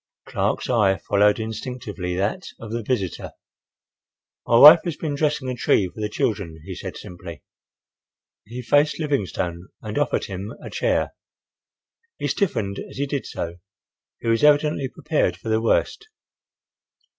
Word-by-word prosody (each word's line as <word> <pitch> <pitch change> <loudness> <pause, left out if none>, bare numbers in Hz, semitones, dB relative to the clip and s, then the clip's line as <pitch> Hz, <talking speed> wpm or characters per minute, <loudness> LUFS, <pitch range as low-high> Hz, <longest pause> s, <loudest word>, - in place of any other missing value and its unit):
Clark's - - -1
eye 105 -6 +3
followed 105 +1 +2
instinctively 110 -5 -5
that 100 - -2
of 110 -1 -8
the 115 +1 -2
visitor. 105 -5 -3 1.1
"My 115 - +5
wife 150 +6 +11
has 170 -4 -3
been 155 -3 -3
dressing 145 -2 0
a 130 - -1
tree 110 -5 +2
for 110 - -8
the 105 - -1
children," 100 -7 -2
he - - -6
said - - -7
simply. 85 -5 -10 1.0
He 120 +4 -7
faced 145 +6 +3
Livingstone 95 - -2
and 110 +5 -4
offered 145 -3 0
him 100 +3 -6
a - - -9
chair. - - 0 1.0
He - - -2
stiffened 110 - -1
as - - -9
he 140 - 0
did 140 -1 -3
so. 85 0 -5 0.6
He - - -6
was 115 +2 +2
evidently 150 -1 +4
prepared 150 +3 -1
for 115 - -7
the 110 0 +2
worst. 405 - 0
115 Hz, 145 wpm, -23 LUFS, 100-145 Hz, 1.1 s, wife